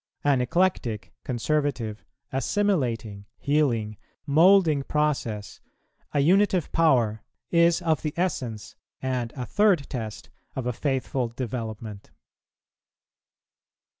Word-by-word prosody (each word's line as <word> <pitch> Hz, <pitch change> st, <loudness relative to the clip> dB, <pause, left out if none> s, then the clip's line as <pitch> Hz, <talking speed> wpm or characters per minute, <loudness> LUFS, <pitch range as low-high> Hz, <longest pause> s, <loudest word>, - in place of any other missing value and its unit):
An 140 Hz, -3 st, +3 dB
eclectic, 125 Hz, -, 0 dB
conservative, 125 Hz, -4 st, -1 dB, 0.3 s
assimilating, 130 Hz, -, -1 dB
healing, 120 Hz, -8 st, 0 dB, 0.3 s
moulding 160 Hz, 0 st, +5 dB
process, 135 Hz, -8 st, -2 dB, 0.5 s
a 145 Hz, -, +2 dB
unitive 185 Hz, +1 st, +3 dB
power, 120 Hz, -10 st, +3 dB, 0.3 s
is 170 Hz, 0 st, +4 dB
of 160 Hz, -1 st, +1 dB
the 150 Hz, -2 st, -3 dB
essence, 120 Hz, -, -2 dB, 0.2 s
and 125 Hz, -3 st, -2 dB
a 125 Hz, -3 st, -4 dB
third 185 Hz, -, +2 dB
test, 110 Hz, -5 st, -6 dB, 0.2 s
of 130 Hz, -, -3 dB
a 125 Hz, -, -1 dB
faithful 130 Hz, -1 st, -1 dB
development. 115 Hz, -4 st, -6 dB
130 Hz, 95 wpm, -26 LUFS, 115-155 Hz, 0.5 s, moulding